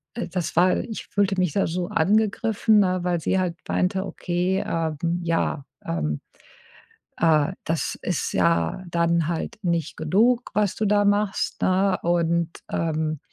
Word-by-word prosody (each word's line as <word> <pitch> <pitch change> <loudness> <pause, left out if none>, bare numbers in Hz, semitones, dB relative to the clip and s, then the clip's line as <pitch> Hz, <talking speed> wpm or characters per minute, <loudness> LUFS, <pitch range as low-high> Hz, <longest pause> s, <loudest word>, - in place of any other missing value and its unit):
äh, 235 - -3
das 175 -2 -3
war 180 +2 +4
ich 220 - -5
fühlte 200 -1 +1
mich 180 -5 +1
da 195 - +1
so 175 +1 -3
angegriffen, 215 +3 +2
ne, 185 -2 +2
weil 175 -2 0
sie 190 - +1
halt 175 -2 -1
meinte: 190 +1 0
„Okay, 180 +2 -1
ähm, 160 -2 -1 0.3
ja, 165 -4 -1 0.2
ähm, 75 -3 -2 1.0
äh, 160 +1 +3
das 165 0 -1
ist - - -2
ja 85 - +1
dann 170 -1 +1
halt 170 +4 -3
nicht 170 -3 -1
genug, 230 +10 +2
was 210 -3 +1
du 215 - -1
da 205 0 +3
machst,“ 205 0 0
ne? 190 +1 +2
Und, 170 -1 +1 0.2
ähm 155 -2 -1
175 Hz, 150 wpm, -24 LUFS, 165-195 Hz, 1.0 s, war